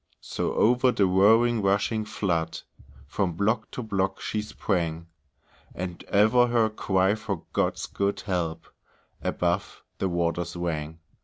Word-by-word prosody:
So - - -3
over 125 +3 +4
the 100 - +2
roaring 110 +5 +4
rushing 100 +2 +1
flood, 85 -6 -2 0.4
From 90 +5 -1
block 110 +5 0
to 125 - -6
block 95 -3 -1
she 105 - -2
sprang, 85 -6 -2 0.7
And 90 -1 -5
ever 110 +5 +4
her 115 -2 +2
cry 95 -2 +1
for 110 - -4
God's - - 0
good 100 0 -2
help 85 -5 -2 0.6
Above - - -1 0.2
the 95 - 0
waters 85 0 -1
rang. 80 -2 -3
100 Hz, 130 wpm, -26 LUFS, 85-110 Hz, 0.7 s, over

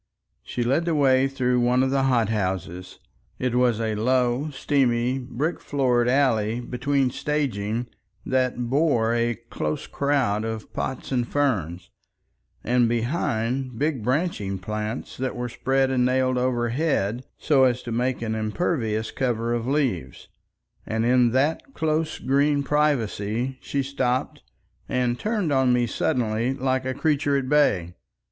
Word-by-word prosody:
She 120 - -3
led 135 +8 +1
the 170 -2 0
way 135 -2 +4
through 125 -2 0
one 125 +1 +3
of 130 - 0
the 135 0 +2
hot 120 -5 +2
houses. 95 -3 -3 0.4
It 125 -1 -1
was 125 -2 +2
a 110 -1 -1
low, 125 +5 +1
steamy, 130 -3 +1
brick 135 +6 -3
floored 125 -4 +1
alley 120 -4 +2
between 125 +2 0
staging 120 -7 -2 0.4
that 130 -1 +1
bore 125 -4 +2
a 120 0 +1
close 90 -10 -4
crowd 135 -7 0
of 110 -1 -5
pots 130 - -4
and 125 -2 0
ferns, 95 - -1 0.7
and 120 0 +2
behind 120 0 -1
big 145 -2 0
branching 125 - -1
plants 105 +5 -5
that 130 0 -2
were 125 0 -3
spread 135 +2 +1
and 125 -1 +2
nailed 130 0 +2
overhead 125 -1 0
so 140 -4 +3
as 125 -1 0
to 120 - -6
make 125 +1 -1
an 110 -1 -2
impervious 110 -1 -1
cover 120 -3 -1
of 120 0 -2
leaves, 125 - -1 0.5
and 110 +1 -1
in 125 0 +4
that 145 - 0
close 155 0 0
green 140 +1 +2
privacy 130 -4 0
she 140 -1 -2
stopped 130 -2 -1 0.5
and 125 -1 0
turned 210 -7 -1
on 130 -2 +3
me 125 0 +3
suddenly 115 +1 0
like 130 -1 -1
a 130 -1 -2
creature 145 -2 +1
at 135 -2 -2
bay. 100 - +2
125 Hz, 140 wpm, -24 LUFS, 115-135 Hz, 0.7 s, way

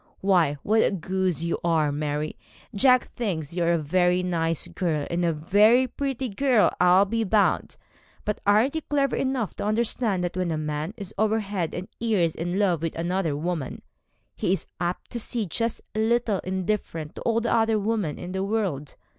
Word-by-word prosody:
Why, 175 -7 +3
what 220 +2 +3
a - - +3
goose 185 -2 -1
you 170 - -1
are, 160 -3 +2
Mary. 150 +1 -2 0.4
Jack 255 +4 +5
thinks 170 -9 -3
you 175 0 0
a 170 0 +3
very 180 +3 +2
nice 165 -3 -1
girl, 160 -6 -1
and 175 +1 0
a 170 - +2
very 210 +11 +4
pretty 265 0 -3
girl, 245 +1 +2
I'll 180 +2 +6
be 225 +3 -1
bound; 210 0 +1 0.5
but 210 - -2
aren't 215 +7 +3
you 320 - -2
clever 280 -3 0
enough 260 -5 -1
to - - -3
understand 215 -2 +1
that 175 0 -3
when 185 -1 -1
a 160 - -1
man 150 +5 -3
is 200 -4 -7
over 220 +1 +2
head 195 -5 -3
and 180 +2 -5
ears 200 -8 +1
in 175 +3 -3
love 185 -6 +2
with 165 -1 -3
one 165 -3 -1
woman, 170 -7 -3 0.5
he 180 - 0
is 195 - -3
apt 175 +1 -3
to 240 - -3
seem 225 -3 -3
just 230 +7 -1
a 215 - -2
little 225 -2 +1
indifferent 185 -4 -3
to - - -9
all 230 -1 +1
the 230 - 0
other 225 -1 +3
women 210 -7 -1
in 180 - -7
the 190 0 -2
world? 195 -10 -2
190 Hz, 190 wpm, -25 LUFS, 170-220 Hz, 0.5 s, I'll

